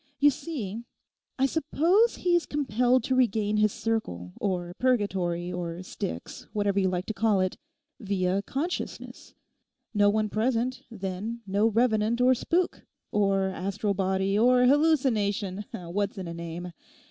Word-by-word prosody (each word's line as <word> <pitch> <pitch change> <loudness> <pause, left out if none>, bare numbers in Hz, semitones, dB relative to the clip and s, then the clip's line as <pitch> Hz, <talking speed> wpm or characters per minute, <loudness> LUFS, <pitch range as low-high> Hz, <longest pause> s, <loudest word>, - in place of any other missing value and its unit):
You 290 +1 +6
see, 235 - -5 0.6
I 265 - +3
suppose 330 - +2
he 355 -1 +1
is 345 - +1
compelled 250 -3 +2
to 260 - 0
regain 220 -4 +2
his 215 0 +3
circle, 90 - -3
or 175 -3 -2
Purgatory, 185 -8 0
or 175 0 -4
Styx, 85 - -6
whatever 205 -1 +1
you 190 -1 +2
like 180 0 -2
to 220 - -3
call 210 -1 +2
it, 185 0 0 0.4
via 195 -3 0
consciousness. 300 - -5 0.6
No 205 -1 +4
one 215 +1 +1
present, 235 +4 0
then 210 +2 -5
no 200 +3 +2
revenant 225 0 +2
or 255 +1 +5
spook, 345 +8 0 0.3
or 195 -2 +2
astral 200 +3 -2
body, 190 +1 0
or 250 +2 +5
hallucination: 225 - +2
what's 190 +4 -3
in 185 -2 -5
a 170 - -5
name? 170 +1 -6
210 Hz, 140 wpm, -27 LUFS, 190-250 Hz, 0.6 s, You